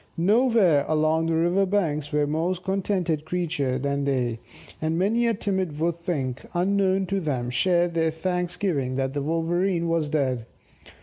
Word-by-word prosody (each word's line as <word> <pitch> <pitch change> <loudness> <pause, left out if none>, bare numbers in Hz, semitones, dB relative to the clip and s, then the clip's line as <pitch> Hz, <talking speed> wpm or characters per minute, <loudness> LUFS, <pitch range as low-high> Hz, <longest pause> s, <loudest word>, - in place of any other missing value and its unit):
Nowhere 200 - +4
along 155 +1 +2
the 165 - +1
river 175 +4 +2
banks 155 -7 -1
were 150 -1 +2
more 160 +5 0
contented 185 -4 -1
creatures 155 -6 -1
than 140 0 -1
they; 125 -4 0 0.4
and 160 +1 0
many 225 +6 +2
a 230 - +1
timid 190 -7 -2
wood 170 +1 0
thing, 145 -8 -2 0.2
unknown 190 +1 +2
to 195 +1 -1
them, 130 -8 -2
shared 175 +5 +2
their 165 -1 +2
thanksgiving 175 -4 -2
that 135 0 -1
the 145 - -2
Wolverene 170 +3 0
was 165 -3 0
dead. 130 -6 -1
165 Hz, 150 wpm, -25 LUFS, 145-185 Hz, 0.4 s, Nowhere